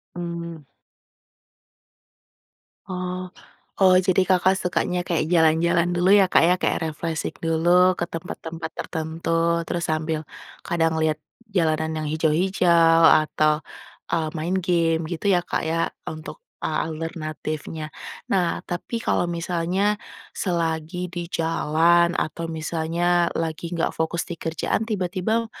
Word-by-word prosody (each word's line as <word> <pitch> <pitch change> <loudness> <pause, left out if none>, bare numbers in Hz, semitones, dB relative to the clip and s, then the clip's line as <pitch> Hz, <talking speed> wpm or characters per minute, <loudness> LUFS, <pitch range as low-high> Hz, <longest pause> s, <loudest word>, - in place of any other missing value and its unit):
Mmm. 170 -3 -6 2.2
Oh. 180 0 -4 0.5
Oh, 185 -1 +7
jadi 185 0 +2
Kakak 185 +1 +4
sukanya 180 0 0
kayak 165 -3 +1
jalan-jalan 170 +1 +3
dulu, 175 +1 +2
ya, 195 - +6
Kak, - - +5
ya. 180 - +5
Kayak - - +1
refreshing 160 0 -3
dulu 175 +3 +4
ke 175 - 0
tempat-tempat 165 -1 -6
tertentu, 165 +1 -1
terus 170 -1 -2
sambil 155 0 -1 0.4
kadang 165 -1 +1
liat 155 -1 +1 0.3
jalanan 160 -4 +1
yang 150 - -3
hijau-hijau, 165 +1 +3 0.2
atau, 155 0 +1 0.5
eee, 160 -2 +1
main 170 +4 -1
game, 165 -2 +2
gitu, 170 +4 -3
ya, 175 - +3
Kak, - - -2
ya, 165 +1 0 0.2
untuk 155 - -7 0.3
a - - -1
alternatifnya. 155 -1 -5 0.4
Nah, 180 -3 +2
tapi 175 +6 -4
kalau 175 - +1
misalnya, 175 +4 0 0.3
selagi 170 0 -2
di 175 -1 -4
jalan, 165 +1 +2
atau 165 +2 -2
misalnya 170 +2 0
lagi 165 +1 -3
nggak 165 - 0
fokus 160 +1 -1
di - - -5
kerjaan, 165 +5 -1
tiba-tiba, 210 +3 -1
170 Hz, 120 wpm, -23 LUFS, 160-180 Hz, 2.2 s, Oh